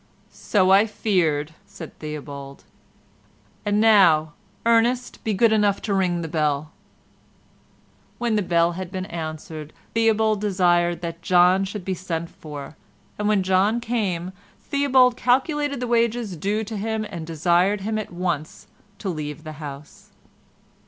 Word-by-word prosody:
"So 190 -3 +2
I 200 +3 +6
feared," 160 -8 0
said 195 -5 -11
Theobald, 140 -2 -8 1.0
"and 205 0 +1
now, 175 -9 +5 0.3
Ernest, 235 +2 +2
be 215 -2 0
good 225 +2 +4
enough 205 -2 +2
to 205 - -1
ring 180 -3 +1
the - - -4
bell." 150 -1 -1 1.5
When 235 -2 0
the 210 - +2
bell 170 -2 +2
had 185 +1 -6
been 185 -1 -4
answered, 155 -4 -7 0.2
Theobald 220 -2 +2
desired 175 -4 +2
that 170 0 -5
John 180 +2 +4
should 195 -1 -6
be 190 - -1
sent 170 -2 -4
for, 150 -1 -9 0.4
and 210 - 0
when 210 -2 +2
John 190 +5 +2
came 200 -7 -2 0.3
Theobald 260 -3 +3
calculated 280 +3 +1
the 250 - -2
wages 235 -3 0
due 205 +7 -1
to 220 0 -6
him 220 +1 -2
and 165 -4 -7
desired 175 +5 +2
him 215 +2 -2
at 215 - -6
once 175 -3 -3 0.3
to 200 - -6
leave 155 -3 -4
the 155 - -7
house. 145 0 -10
190 Hz, 140 wpm, -23 LUFS, 165-220 Hz, 1.5 s, I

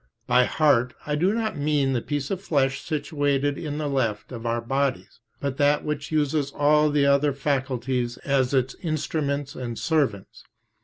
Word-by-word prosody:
By 125 0 +4
"heart" 125 -6 +2
I 150 - -2
do 175 +6 +2
not 220 -5 -2
mean 145 -2 +1
the 120 - 0
piece 145 0 -3
of 190 -1 -2
flesh 135 -7 0
situated 145 -2 0
in 150 -1 -5
the 150 -1 -2
left 115 -7 -1
of 120 -1 -5
our 115 0 0
bodies, 125 -6 -2 0.2
but 140 -2 -3
that 145 +1 +2
which 150 -1 -3
uses 150 -2 +1
all 150 +1 +4
the 145 -1 +2
other 140 +1 +3
faculties 130 -3 -1
as 135 -2 +2
its 130 -1 +1
instruments 145 -3 -2
and 120 -3 -5
servants. 140 - -1
140 Hz, 165 wpm, -25 LUFS, 130-150 Hz, 0.2 s, By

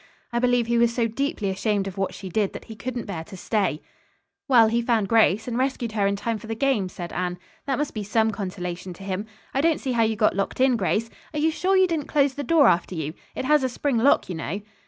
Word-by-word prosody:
"I 235 - +2
believe 245 -1 +2
he 235 0 +1
was 235 0 +4
so 235 -1 +1
deeply 230 - -2
ashamed 200 +1 0
of 190 - -6
what 195 -1 -2
she 195 - -8
did 200 +2 0
that - - -8
he 220 - -9
couldn't 240 +3 -5
bear 175 -6 -5
to 190 0 -10
stay." 195 -5 -1 0.6
"Well, 240 -4 +7
he 230 +2 +1
found 230 -4 +1
Grace, 220 -1 +3
and 240 0 -2
rescued 255 -3 -1
her 205 -2 +1
in 200 - +1
time 225 +2 -2
for 220 - -11
the 225 - -3
game," 225 -6 +1
said 175 -1 -7
Anne. 180 0 -2 0.3
"That 270 -2 0
must 295 0 -2
be 215 - -3
some 220 +2 +1
consolation 185 -2 -5
to 195 - -12
him. 195 +2 -3 0.3
I 270 - +1
don't 325 0 +2
see 265 - -3
how 235 -2 +2
you 220 0 +2
got 210 -2 +2
locked 195 +4 -2
in, 260 -1 +4
Grace. 225 +2 0 0.2
Are - - 0
you 320 +2 +3
sure 380 +4 +1
you 375 - +6
didn't 325 -5 -2
close 280 -2 +2
the 285 - -4
door 310 +1 +5
after 175 +1 +2
you. 155 -1 -3 0.2
It - - -3
has 300 +1 +4
a 260 - +1
spring 260 +1 -1
lock, 270 +5 +4
you 185 - -4
know." 165 +4 -4
225 Hz, 260 wpm, -24 LUFS, 195-255 Hz, 0.6 s, Well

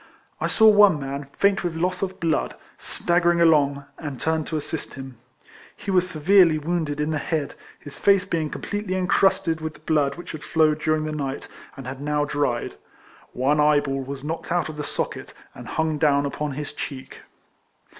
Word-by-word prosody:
I - - 0
saw 220 - +5
one 205 -6 +6
man, 140 0 -5
faint 200 -1 +2
with 175 -2 -2
loss 180 +2 -1
of 190 -1 -3
blood, 165 -2 0 0.2
staggering 175 0 +1
along, 145 -4 +3
and 145 -5 -6
turned 160 -1 -1
to 160 - -2
assist 155 +1 -5
him. 130 -3 -9 0.6
He 200 - -4
was 180 -1 +2
severely 170 0 +4
wounded 155 -2 -2
in 150 +1 0
the 155 - -1
head, 150 -1 -2 0.3
his 145 - -11
face 200 -1 +4
being 165 -5 -1
completely 205 +1 -4
incrusted 180 -2 +2
mth 160 0 -5
the 150 - -17
blood 150 -3 +1
which 175 - -8
had 155 - -8
flowed 155 -1 +2
during 155 0 +1
the 155 - -3
night, 140 -3 -4 0.3
and 135 - -8
had 130 +1 -6
now 150 0 0
dried. 145 -5 -1 0.6
One 140 +4 +1
eyeball 145 -2 +2
was 135 +1 -7
knocked 165 +2 -5
out 175 -2 +1
of 155 - -8
the 150 - -3
socket, 145 - -4 0.2
and - - -11
hung 160 -1 -1
down 145 -2 +3
upon 145 +1 -3
his 150 +2 -6
cheek. 135 -3 -7
155 Hz, 185 wpm, -24 LUFS, 145-170 Hz, 0.6 s, one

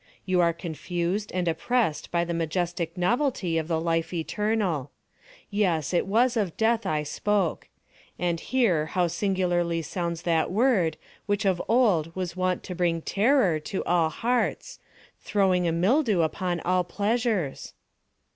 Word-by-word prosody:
You 185 -1 +2
are 170 -1 +4
confused 175 +4 -3
and 180 -1 -1
oppressed 165 0 0
by 170 0 0
the 170 - -3
majestic 170 +1 -2
novelty 185 - +1
of 160 - -4
the 165 -2 0
Life 165 0 -1
Eternal. 180 - -1 0.6
Yes, 185 -7 0
it 175 - +1
was 235 +5 +3
of 200 -7 -1
Death 225 -2 +1
I 155 -2 0
spoke. 195 +3 -1 0.5
And 170 -2 -1
here 185 -13 +1
how 180 +2 +1
singularly 175 -2 0
sounds 170 +1 -3
that 165 -2 +1
word 195 -7 +2 0.3
which 205 0 0
of 185 -3 +2
old 195 -9 +2
was 180 -2 -3
wont 185 0 -1
to 180 - -6
bring 170 -2 0
terror 205 - +2
to 185 +5 -4
all 170 -2 +2
hearts—throwing 200 - -1
a - - +2
mildew 205 - +2
upon 175 +1 -1
all 180 0 +1
pleasures! 210 - -1
180 Hz, 140 wpm, -26 LUFS, 165-205 Hz, 0.6 s, are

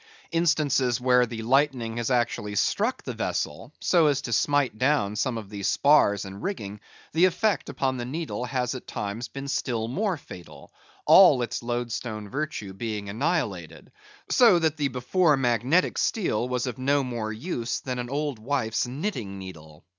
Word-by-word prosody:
Instances 150 -7 +2
where 125 -1 +4
the 115 -1 -6
lightning 125 -2 +1
has 120 0 -1
actually 120 -4 0
struck - - 0
the - - -5
vessel, - - -3
so 170 -3 +3
as 140 -2 +2
to 120 - -3
smite 140 -3 +1
down 130 -7 +2
some 120 +2 -1
of 105 -2 -8
the 100 -1 -6
spars 105 -4 +3
and 95 +1 -9
rigging, 105 - -4 0.3
the 165 +4 +5
effect 195 +2 +1
upon 130 -1 -1
the 120 - -4
needle 145 -2 -4
has 125 -1 -1
at 130 - -8
times 105 +4 -4
been 140 +2 -7
still 120 -5 -1
more 190 - -1
fatal; 90 - -13 0.3
all 150 -10 +7
its 120 0 -4
loadstone 120 -3 -4
virtue 140 -8 -4
being 105 0 -4
annihilated, 100 - -2 0.4
so 230 -8 +6
that 160 -2 +1
the 145 -2 0
before 140 +5 +2
magnetic 125 - +1
steel 125 - 0
was 125 0 -1
of 125 -1 -5
no 140 +2 +2
more 120 -4 -3
use 120 -1 -3
than 125 -1 -4
an 120 0 -4
old 145 -3 -2
wife's 115 -2 -1
knitting 125 - -4
needle. 80 -5 -11
125 Hz, 165 wpm, -26 LUFS, 110-145 Hz, 0.4 s, all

